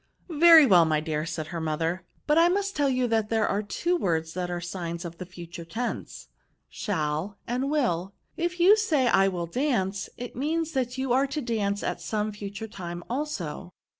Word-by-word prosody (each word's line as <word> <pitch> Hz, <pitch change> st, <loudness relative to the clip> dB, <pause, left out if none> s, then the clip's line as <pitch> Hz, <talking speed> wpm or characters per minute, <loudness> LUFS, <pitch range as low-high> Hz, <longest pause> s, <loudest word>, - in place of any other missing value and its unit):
*' -, -, -45 dB
" -, -, -37 dB, 0.2 s
Very 325 Hz, -3 st, +10 dB
well, 180 Hz, -8 st, +6 dB
my 155 Hz, -1 st, +2 dB
dear," 155 Hz, 0 st, -2 dB
said 160 Hz, -1 st, -4 dB
her 170 Hz, -1 st, -4 dB
mother; 165 Hz, +3 st, -2 dB
" -, -, -38 dB
but 300 Hz, -, +3 dB
I 335 Hz, +1 st, +6 dB
must 395 Hz, +2 st, -1 dB
tell 285 Hz, -2 st, +2 dB
you 255 Hz, -1 st, +1 dB
that 220 Hz, -2 st, +1 dB
there 220 Hz, -2 st, +2 dB
are 200 Hz, -, 0 dB
two 340 Hz, -, -1 dB
words 165 Hz, -, -1 dB
which 180 Hz, -1 st, -2 dB
are 175 Hz, 0 st, -2 dB
signs 175 Hz, -1 st, -5 dB
of 170 Hz, -1 st, -8 dB
the 185 Hz, -, -6 dB
future 175 Hz, -2 st, -9 dB
tense, 220 Hz, +9 st, -5 dB, 0.4 s
shall 165 Hz, 0 st, -2 dB
and 255 Hz, +3 st, -1 dB
will; 195 Hz, -, 0 dB, 0.2 s
if 350 Hz, +1 st, -2 dB
you 375 Hz, +5 st, +7 dB
say 325 Hz, -12 st, +1 dB
I 195 Hz, -3 st, +4 dB
will 180 Hz, -3 st, -2 dB
dance, 195 Hz, -, -1 dB
it 245 Hz, 0 st, -7 dB
means 320 Hz, +5 st, -1 dB
that 255 Hz, -3 st, -2 dB
you 260 Hz, -2 st, 0 dB
are 270 Hz, +2 st, +3 dB
to 290 Hz, +3 st, -3 dB
dance 210 Hz, -5 st, -1 dB
at -, -, -3 dB
some 215 Hz, -1 st, -2 dB
future 205 Hz, +1 st, -7 dB
time 175 Hz, -4 st, -7 dB
also." 185 Hz, -, -4 dB
205 Hz, 205 wpm, -27 LUFS, 175-270 Hz, 0.4 s, Very